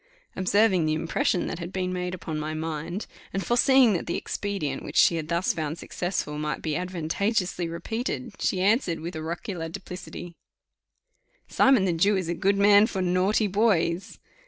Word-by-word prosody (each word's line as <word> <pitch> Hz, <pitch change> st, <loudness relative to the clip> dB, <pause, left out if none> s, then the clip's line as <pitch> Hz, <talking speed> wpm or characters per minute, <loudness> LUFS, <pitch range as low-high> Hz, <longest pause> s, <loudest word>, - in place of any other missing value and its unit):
Observing 185 Hz, -1 st, +3 dB
the 155 Hz, -, +1 dB
impression 180 Hz, -, 0 dB
that -, -, -4 dB
had 175 Hz, +1 st, -6 dB
been 185 Hz, -1 st, -2 dB
made 180 Hz, 0 st, -3 dB
upon 160 Hz, -3 st, -5 dB
my 155 Hz, +1 st, -3 dB
mind, 160 Hz, +4 st, -4 dB, 0.3 s
and 195 Hz, 0 st, -3 dB
foreseeing 250 Hz, -1 st, +5 dB
that 175 Hz, -, -3 dB
the 170 Hz, -, -1 dB
expedient, 190 Hz, -10 st, -3 dB
which -, -, -8 dB
she 170 Hz, -, +6 dB
had 160 Hz, -2 st, -3 dB
thus 170 Hz, +2 st, 0 dB
found 155 Hz, 0 st, -3 dB
successful, 175 Hz, -5 st, -3 dB
might 150 Hz, 0 st, -3 dB
be 155 Hz, -, -1 dB
advantageously 180 Hz, +2 st, -1 dB
repeated, 225 Hz, +7 st, -4 dB
she 185 Hz, -, 0 dB
answered 195 Hz, -, +2 dB
with 170 Hz, +2 st, -6 dB
oracular 165 Hz, +2 st, -4 dB
duplicity, 180 Hz, -1 st, -8 dB, 1.1 s
"Simon 260 Hz, -8 st, +4 dB
the 180 Hz, -, +1 dB
Jew 195 Hz, +5 st, +3 dB
is 180 Hz, -3 st, -3 dB
a -, -, +1 dB
good 195 Hz, +4 st, +1 dB
man 205 Hz, +1 st, +6 dB
for 190 Hz, -4 st, -2 dB
naughty 185 Hz, +4 st, +2 dB
boys." 195 Hz, -4 st, +1 dB
180 Hz, 165 wpm, -26 LUFS, 165-200 Hz, 1.1 s, she